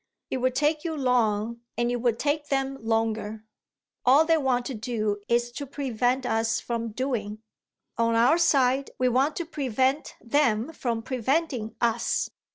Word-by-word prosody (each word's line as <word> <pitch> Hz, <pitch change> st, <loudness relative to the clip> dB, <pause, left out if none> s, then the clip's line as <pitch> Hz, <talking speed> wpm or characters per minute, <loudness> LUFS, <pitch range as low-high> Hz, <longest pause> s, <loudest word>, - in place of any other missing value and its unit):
"It -, -, 0 dB
would 255 Hz, 0 st, 0 dB
take 300 Hz, 0 st, +1 dB
you 325 Hz, -2 st, -3 dB
long, 235 Hz, -3 st, +1 dB, 0.2 s
and 240 Hz, 0 st, +1 dB
it 245 Hz, -, 0 dB
would 235 Hz, -1 st, 0 dB
take 295 Hz, +2 st, -1 dB
them 270 Hz, -1 st, -1 dB
longer! 220 Hz, -1 st, -1 dB, 0.6 s
All 275 Hz, +5 st, +6 dB
they 325 Hz, 0 st, +4 dB
want 255 Hz, -3 st, +1 dB
to 270 Hz, -, -4 dB
do 215 Hz, -3 st, -2 dB
is 240 Hz, 0 st, +1 dB
to 280 Hz, +3 st, -6 dB
prevent 255 Hz, -2 st, -1 dB
us 225 Hz, -1 st, +1 dB
from 230 Hz, -1 st, -3 dB
doing. 220 Hz, -3 st, -3 dB, 0.6 s
On 230 Hz, 0 st, +2 dB
our 245 Hz, +9 st, +4 dB
side 270 Hz, -4 st, +3 dB
we 255 Hz, -, +2 dB
want 265 Hz, +5 st, +2 dB
to 345 Hz, -, -3 dB
prevent 270 Hz, -2 st, -1 dB
them 245 Hz, +1 st, +1 dB
from 230 Hz, -6 st, -2 dB
preventing 255 Hz, -2 st, -1 dB
us. 235 Hz, 0 st, 0 dB
245 Hz, 160 wpm, -26 LUFS, 225-275 Hz, 0.6 s, All